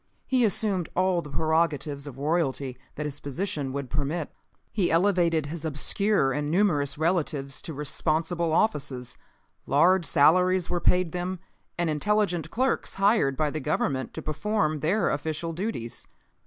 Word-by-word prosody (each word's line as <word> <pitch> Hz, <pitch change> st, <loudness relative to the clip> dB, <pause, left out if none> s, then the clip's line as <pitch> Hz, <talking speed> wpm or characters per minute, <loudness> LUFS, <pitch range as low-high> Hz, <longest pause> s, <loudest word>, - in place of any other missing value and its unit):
He 255 Hz, -2 st, +2 dB
assumed 200 Hz, -5 st, +1 dB
all 185 Hz, -1 st, +2 dB
the 150 Hz, -, -10 dB
prerogatives 150 Hz, -2 st, 0 dB
of 135 Hz, -2 st, -9 dB
royalty 140 Hz, -3 st, -1 dB, 0.2 s
that 150 Hz, -, -4 dB
his 145 Hz, -1 st, -5 dB
position 145 Hz, -2 st, -3 dB
would 135 Hz, -2 st, -5 dB
permit. 145 Hz, +3 st, -2 dB, 0.4 s
He 195 Hz, -5 st, +1 dB
elevated 170 Hz, -3 st, +2 dB
his 160 Hz, +2 st, -6 dB
obscure 160 Hz, +1 st, +1 dB
and 150 Hz, +1 st, -2 dB
numerous 155 Hz, -6 st, +2 dB
relatives 155 Hz, -5 st, 0 dB
to 160 Hz, -, -6 dB
responsible 160 Hz, +3 st, 0 dB
offices. 140 Hz, -, 0 dB, 0.5 s
Large 170 Hz, +5 st, +4 dB
salaries 180 Hz, +4 st, +4 dB
were 175 Hz, -1 st, 0 dB
paid 180 Hz, -2 st, +2 dB
them 180 Hz, +2 st, -3 dB, 0.4 s
and 175 Hz, -1 st, +1 dB
intelligent 175 Hz, +2 st, 0 dB
clerks 260 Hz, +3 st, -1 dB
hired 195 Hz, -, +3 dB
by 150 Hz, -2 st, +1 dB
the 155 Hz, -, -3 dB
Government 135 Hz, -2 st, -1 dB
to -, -, -5 dB
perform 155 Hz, 0 st, 0 dB
their 175 Hz, +6 st, +1 dB
official 160 Hz, +3 st, -3 dB
duties. 170 Hz, -, -5 dB
160 Hz, 140 wpm, -26 LUFS, 145-185 Hz, 0.5 s, Large